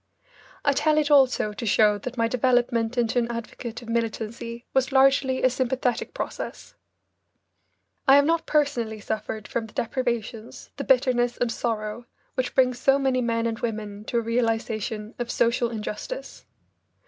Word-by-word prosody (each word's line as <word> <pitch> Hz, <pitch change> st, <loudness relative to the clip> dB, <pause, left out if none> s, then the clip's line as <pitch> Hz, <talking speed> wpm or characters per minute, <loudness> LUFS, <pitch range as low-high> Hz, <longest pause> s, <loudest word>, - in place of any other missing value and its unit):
I 285 Hz, -, +4 dB
tell 305 Hz, +2 st, +2 dB
it 300 Hz, -1 st, +2 dB
also 260 Hz, -6 st, +4 dB
to 220 Hz, -, -6 dB
show 210 Hz, 0 st, +4 dB
that 250 Hz, +4 st, -6 dB
my 230 Hz, 0 st, +2 dB
development 245 Hz, -1 st, +1 dB
into 240 Hz, 0 st, +2 dB
an 235 Hz, -1 st, -1 dB
advocate 235 Hz, +1 st, -6 dB
of 230 Hz, -, -11 dB
militancy 230 Hz, +1 st, -3 dB
was 265 Hz, 0 st, +2 dB
largely 265 Hz, -1 st, +3 dB
a 255 Hz, -, +6 dB
sympathetic 255 Hz, -1 st, -1 dB
process. -, -, -6 dB, 1.3 s
I 270 Hz, -, +8 dB
have 285 Hz, 0 st, +6 dB
not 330 Hz, +1 st, +1 dB
personally 250 Hz, -8 st, 0 dB
suffered 215 Hz, 0 st, -4 dB
from 230 Hz, -1 st, -3 dB
the -, -, -17 dB
deprivations, 235 Hz, -2 st, -3 dB
the 280 Hz, -, -3 dB
bitterness 250 Hz, -2 st, +2 dB
and 245 Hz, -1 st, 0 dB
sorrow 225 Hz, 0 st, -3 dB, 0.3 s
which 255 Hz, -1 st, -2 dB
bring 255 Hz, -1 st, +4 dB
so 270 Hz, +3 st, +3 dB
many 265 Hz, -2 st, +1 dB
men 230 Hz, -1 st, 0 dB
and 225 Hz, 0 st, -2 dB
women 210 Hz, -3 st, -4 dB
to 240 Hz, -, -1 dB
a -, -, +3 dB
realisation 225 Hz, -2 st, -1 dB
of 240 Hz, -1 st, -3 dB
social 235 Hz, 0 st, +1 dB
injustice. 230 Hz, -, -6 dB
235 Hz, 155 wpm, -25 LUFS, 225-260 Hz, 1.3 s, I